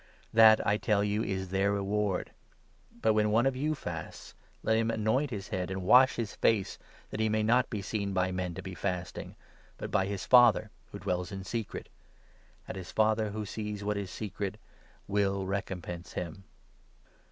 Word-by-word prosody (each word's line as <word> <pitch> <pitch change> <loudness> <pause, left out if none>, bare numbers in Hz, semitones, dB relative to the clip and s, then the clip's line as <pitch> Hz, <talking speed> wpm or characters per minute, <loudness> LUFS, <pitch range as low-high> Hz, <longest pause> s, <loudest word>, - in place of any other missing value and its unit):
That, 110 -1 +7
I 105 - +3
tell 105 -1 +1
you, 105 +1 0
is 95 -3 -3
their 95 +2 +1
reward! 100 -1 -1 0.7
But, 110 - +4
when 105 0 +2
one 115 +4 +3
of 135 -1 +2
you 150 +4 0
fasts, - - -7 0.3
let 110 - +2
him 115 0 +1
anoint 115 +6 +1
his 100 -6 -5
17 95 - -3
head 90 - -3
and 95 -1 -4
wash 130 +7 +6
his 115 -4 -3
face, 105 -4 +1 0.3
that - - -5
he 110 0 +2
may 110 0 +1
not 125 +3 +3
be 105 -4 -4
seen 100 -1 -2
by 95 0 +1
men 90 -2 -3
to 95 - -6
be 95 - -6
18 90 - -9
fasting, 90 -2 -3 0.4
but - - -6
by 95 - +2
his 100 -1 -4
Father 120 -3 +6 0.2
who - - -6
dwells 90 +2 -2
in 95 -1 -5
secret; 110 +2 -4 0.8
and - - -5
his 95 -1 -7
Father, 110 0 +2
who 105 +1 -4
sees 105 0 -5
what 105 +1 0
is 100 -2 -3
secret, 100 0 -4 0.5
will 100 -1 +1
recompense 90 -2 -4
him. 90 +2 -5
100 Hz, 185 wpm, -30 LUFS, 95-110 Hz, 0.8 s, That